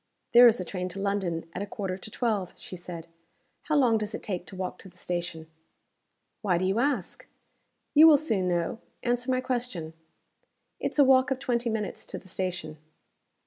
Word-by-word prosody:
"There 240 +1 +10
is 230 0 +4
a 185 - -3
train 180 0 -4
to 190 +2 -7
London 195 -5 -1
at 180 - -4
a 200 - -3
quarter 195 -2 -4
to 190 - -8
twelve," 215 -5 -1
she - - -8
said. 175 -2 -8 0.6
"How 305 - +1
long 245 -6 +4
does 210 0 -4
it - - -7
take 180 -3 -4
to - - -9
walk 185 0 -4
to 190 - -10
the 180 - -23
station?" 175 -2 -4 1.0
"Why 185 -5 +2
do 185 - 0
you 195 +4 +1
ask?" 250 -8 -1 0.7
"You 315 +2 +9
will 305 -2 +8
soon 215 - 0
know. 175 +5 -1 0.2
Answer 245 +1 0
my 255 0 +2
question." 240 -11 -3 0.9
"It's - - -3
a 285 - +8
walk 265 0 +5
of 265 - 0
twenty 240 -2 -1
minutes 220 -2 -4
to - - -4
the - - -13
station." 180 -4 -4
200 Hz, 190 wpm, -28 LUFS, 180-245 Hz, 1.0 s, There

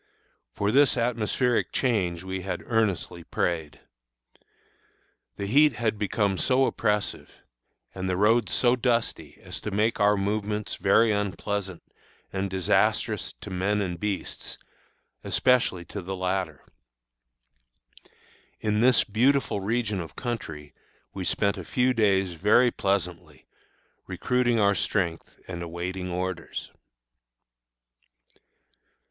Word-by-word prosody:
For 100 +1 0
this 140 +1 +4
atmospheric 120 +1 0
change 95 -9 0
we 95 0 -4
had 95 - -4
earnestly 100 -6 -1
prayed. 80 -2 -2 1.6
The 100 - -4
heat 145 +7 +5
had 110 -3 -1
become 100 -2 0
so 130 0 +3
oppressive, 105 -4 -1 0.6
and 95 0 -3
the 90 - 0
roads 110 +1 +3
so 125 0 +3
dusty, 120 -2 -1
as - - -7
to - - -4
make 105 +3 +1
our 105 0 +4
movements 105 +1 -2
very 110 +3 +4
unpleasant 100 -2 -2 0.5
and 95 0 -1
disastrous 95 -2 +1
to - - -8
men 100 +3 0
and 90 -4 -3
beasts, 105 -1 -4 0.7
especially 125 -9 +2
to 100 - -6
the 95 +2 -5
latter. 90 -4 -2 1.9
In 105 0 0
this 125 0 +5
beautiful 125 +1 +2
region 105 0 -1
of 80 - -9
country 80 - -5 0.4
we 95 - -4
spent 100 +2 0
a - - -6
few 125 +8 +1
days 95 -5 +2
very 105 +8 +4
pleasantly, 90 -8 -2 0.6
recruiting 125 -2 +1
our 100 -1 +4
strength 90 -3 -2
and 90 -2 -6
awaiting 90 +2 -4
orders. 90 -1 -4
100 Hz, 115 wpm, -26 LUFS, 95-115 Hz, 1.9 s, heat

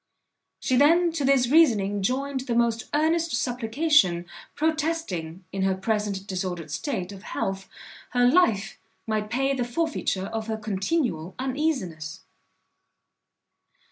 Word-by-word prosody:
She 255 - +1
then 335 +5 +5
to 320 -3 -2
this 265 -2 +4
reasoning 215 -10 +4
joined 265 +6 -1
the 235 - 0
most 230 -1 +1
earnest 320 +2 +1
supplication, 245 - +2 0.3
protesting, 300 - -2
in 195 - -3
her 190 0 +2
present 200 0 -2
disordered 180 -5 -4
state, 185 - -3
of 195 -1 -10
health, 195 0 -4 0.4
her 245 0 +2
life 245 - +3 0.3
might 215 -2 -2
pay 270 +3 +1
the 255 -2 -1
forfeiture 245 - -1
of 225 +1 -4
her 220 -1 -2
continual 195 - -2
uneasiness. 255 - -2
230 Hz, 120 wpm, -26 LUFS, 195-290 Hz, 0.4 s, then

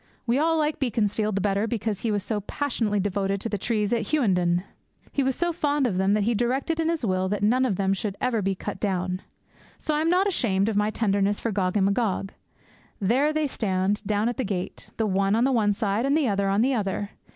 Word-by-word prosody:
We 245 +3 +2
all 325 +1 +2
like 305 0 0
Beaconsfield 215 -4 0
the 195 - 0
better 200 +2 +1
because 220 -3 -2
he 230 - -2
was 205 -2 0
so 210 0 -2
passionately 225 -3 -1
devoted 195 0 -1
to 230 - -3
the 205 - -2
trees 210 0 0
at 225 -3 -1
Hughenden. 180 - +2 0.5
He 280 - 0
was 265 -1 +1
so 345 -1 0
fond 290 -3 +1
of 205 -7 0
them 190 +1 +2
that 210 - +1
he 235 +3 +1
directed 260 +8 0
in 325 0 +1
his 330 -7 -1
will 185 -1 0
that 205 0 -2
none 250 +5 +3
of 205 - 0
them 195 +1 +1
should 200 0 -3
ever 245 -4 0
be 195 0 0
cut 185 - -6
down. 185 -2 -1 0.6
So 310 - -2
I 300 - +1
am 325 - +1
not 365 +3 +3
ashamed 220 - +1
of 220 - -2
my 210 +1 +2
tenderness 205 -2 +1
for 230 - -2
Gog 185 0 0
and 195 - +3
Magog. 200 -1 0 0.7
There 255 +10 +2
they 310 0 0
stand, 200 -5 -1
down 210 +1 0
at 240 - -2
the 260 - 0
gate; 190 -4 -4
the 225 - +1
one 195 0 +2
on 230 - +2
the 270 - +3
one 220 -5 +3
side, 205 +4 0
and 285 +2 +3
the 300 -5 +2
other 200 -2 +1
on 200 +2 +2
the 265 +2 +2
other. 205 -2 -2
210 Hz, 240 wpm, -25 LUFS, 195-255 Hz, 0.7 s, none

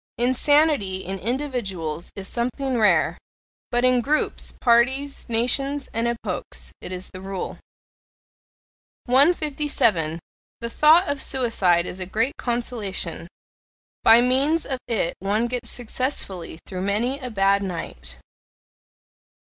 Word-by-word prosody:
Insanity 255 -5 +2
in 190 +2 -4
individuals 195 - -3
is 195 -1 -6
something 255 +3 -2
rare 175 -7 +3 0.5
but 240 +1 +2
in 255 -1 +4
groups, 300 +5 0
parties, 265 +4 +1
nations, 270 +5 0
and 230 +1 0
epochs 235 -1 -4
it - - -6
is 185 0 -6
the 185 - -8
rule. 195 -1 -5 1.5
157. 270 - +2 0.4
The 235 - -4
thought 315 +8 +5
of 285 -1 -1
suicide 195 -10 +2
is 185 - -6
a 185 - -4
great 225 +8 0
consolation: 210 -8 -3 0.8
by 230 +1 +8
means 275 +6 +2
of 265 -2 -3
it 210 -7 0
one 205 +4 0
gets 240 -1 -3
successfully 225 - -3
through 185 -2 -5
many 225 +8 0
a 255 -3 -5
bad 200 -2 +2
night. 185 -4 -6
235 Hz, 115 wpm, -23 LUFS, 195-265 Hz, 1.5 s, by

